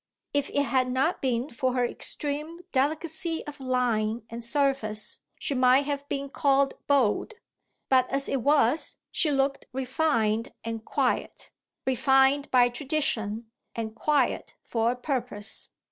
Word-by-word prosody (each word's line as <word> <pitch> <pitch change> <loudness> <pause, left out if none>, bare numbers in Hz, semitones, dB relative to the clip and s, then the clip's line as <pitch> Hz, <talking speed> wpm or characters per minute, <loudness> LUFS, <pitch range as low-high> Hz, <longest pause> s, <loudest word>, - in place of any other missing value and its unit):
If 285 -1 0
it 285 - +1
had 255 -2 +1
not 270 +7 +1
been 255 +2 -1
for 255 0 -1
her 250 -1 +2
extreme 300 +6 -4
delicacy 315 +4 -1
of 295 0 -8
line 240 -4 0
and 230 +1 -4
surface 235 -5 +1 0.2
she - - -3
might 255 +1 +4
have 285 0 -3
been 280 0 -2
called 275 0 +2
bold; 280 - +2 0.5
but 255 -1 +3
as 275 0 +1
it 270 - -1
was 285 +1 +2
she 315 - +1
looked 275 -1 0
refined 250 -4 0
and 225 -1 -4
quiet - - -1 0.3
refined 265 +2 +3
by 245 -1 +5
tradition 240 -5 -2 0.2
and 220 -1 -4
quiet 275 +3 0
for 230 0 0
a - - -9
purpose. 245 -5 -3
265 Hz, 135 wpm, -27 LUFS, 235-285 Hz, 0.5 s, by